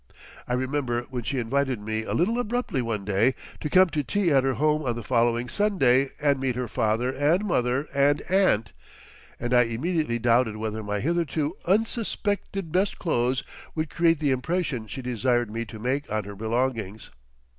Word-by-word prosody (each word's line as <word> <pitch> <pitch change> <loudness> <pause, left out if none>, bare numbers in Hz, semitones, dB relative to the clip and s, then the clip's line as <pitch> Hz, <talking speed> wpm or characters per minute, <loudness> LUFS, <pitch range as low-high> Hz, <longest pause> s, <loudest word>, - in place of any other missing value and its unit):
I 125 - -1
remember 130 -2 -1
when 125 -1 -3
she 135 +4 -3
invited 130 +1 0
me 110 +1 -3
a - - -2
little 225 +8 +1
abruptly 235 - -1
one 110 -4 -3
day 105 +6 +2 0.2
to 150 - -3
come 185 +3 +5
to 150 -1 -1
tea 195 +3 +1
at 135 -2 +4
her 135 -1 +1
home 150 +2 +2
on 125 -5 -1
the 120 - -6
following 120 +1 +1
Sunday 135 -6 +2
and 140 -2 +2
meet 130 -2 -1
her 125 -1 -2
father 110 +4 0
and 150 +9 +1
mother 130 -5 0
and 140 +1 +3
aunt, 185 - +2 0.6
that 120 +1 -3
I 125 - +7
immediately 130 +2 -1
doubted 120 -1 +2
whether 110 0 -3
my 105 -1 -3
hitherto 160 -1 0
unsuspected 205 -3 -1
best 190 +4 +1
clothes 130 -6 0 0.3
would 155 -2 -2
create 165 -1 +3
the 145 -2 +1
impression 130 -3 -1
she 130 +4 -6
desired 120 -1 0
me 115 +1 -3
to 110 0 -10
make 130 +5 -2
on 110 0 0
her 100 +1 -8
belongings. 110 -1 -2
130 Hz, 175 wpm, -26 LUFS, 115-155 Hz, 0.6 s, I